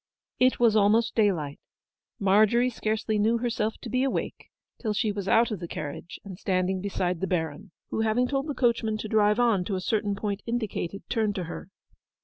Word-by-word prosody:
It 255 0 +3
was 230 -3 +4
almost 220 +2 +3
daylight. 175 -10 +1 0.6
Margery 215 +5 +4
scarcely 220 -1 -1
knew 225 +3 +3
herself 225 -2 -1
to - - -7
be 255 - +1
awake 270 - -3 0.3
till 215 -3 -1
she 210 +1 0
was 200 -2 -5
out 230 +3 +4
of 210 - -3
the 170 - -6
carriage 155 +2 -6
and 190 -2 -9
standing 185 -1 0
beside 180 -3 -2
the 190 - 0
Baron, 165 +2 -2 0.2
who, - - 0
having 225 +3 +2
told 275 +2 -1
the 290 - -3
coachman 230 -3 +1
to 215 - -5
drive 210 +1 +3
on 230 -6 +3
to 195 - -2
a - - -1
certain 205 +1 0
point 200 0 -3
indicated, 220 -5 -3
turned 215 -3 0
to 185 - -2
her. 175 +3 -7
210 Hz, 190 wpm, -27 LUFS, 190-230 Hz, 0.6 s, was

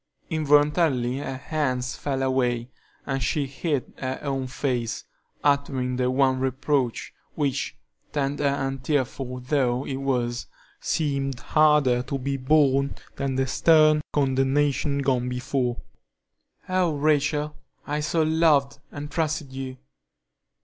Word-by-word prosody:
Involuntarily 145 -4 +3
her 135 -2 -4
hands 130 -3 -2
fell 135 -2 -2
away, 125 -2 0 0.3
and 135 -1 -2
she 140 +4 0
hid 140 0 -3
her 130 0 -3
own 135 -2 -2
face, 125 -3 -2 0.4
uttering 140 -3 +1
the 125 0 +1
one 130 0 +2
reproach, 130 -1 -1 0.2
which, 140 -3 -1 0.3
tender 145 0 -1
and 135 -1 -1
tearful 130 -2 -1
though 130 -1 0
it 135 - -3
was, 125 -3 -1 0.3
seemed 140 -4 -1
harder 150 -5 +3
to 135 +2 -3
be 135 +1 -2
borne 140 0 +3 0.2
than 135 -1 -1
the 135 0 +1
stern 155 +2 +5
condemnation 140 +1 +1
gone 125 -2 +1
before. 125 0 -1 0.9
"Oh, 185 -4 +1
Rachel, 150 0 +1 0.3
I 150 +1 -2
so 155 +2 +1
loved 155 -3 +3
and 145 0 -7
trusted 155 -4 -2
you!" 130 -1 -5
135 Hz, 120 wpm, -25 LUFS, 130-150 Hz, 0.9 s, stern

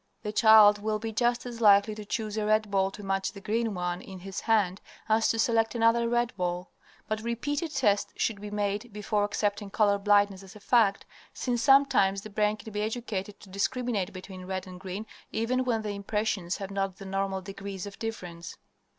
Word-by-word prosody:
The 210 - -3
child 215 -1 +7
will 215 0 0
be 225 +1 -5
just 240 +2 +1
as 235 -1 -7
likely 205 0 +6
to 210 0 -7
choose 215 0 -3
a 215 - -1
red 215 0 +2
ball 195 -1 +2
to 205 +1 -10
match 195 0 -1
the 200 - -9
green 220 +2 -1
one 180 0 -2
in 190 - -10
his 195 +2 -6
hand 205 -4 +1 0.3
as 220 +1 +3
to 225 - +1
select 225 0 +2
another 230 0 +3
red 240 0 0
ball. 180 -1 -3 0.4
But 215 0 -2
repeated 285 +8 -2
tests 205 -7 +1
should 205 -3 -1
be 210 - -6
made 205 +2 -2
before 210 0 -1
accepting 205 0 -1
color 200 0 +2
blindness 205 -1 +3
as 195 +2 -13
a - - -11
fact, 205 -2 +3 0.3
since 240 -2 -1
sometimes 270 -8 +4
the 215 - -9
brain 210 +1 +1
can 220 0 -10
be 210 - -1
educated 210 -3 -4
to 200 - -14
discriminate 205 0 -1
between 185 0 -9
red 185 0 -4
and 185 -1 -10
green 190 +3 -6 0.3
even 255 +3 0
when 225 -3 0
the 210 - -3
impressions 200 -2 -2
have 195 0 -6
not 195 -1 -2
the 195 - -10
normal 195 0 -2
degree 195 0 -7
of 200 0 -10
difference. 180 -7 -6
210 Hz, 200 wpm, -28 LUFS, 195-225 Hz, 0.4 s, child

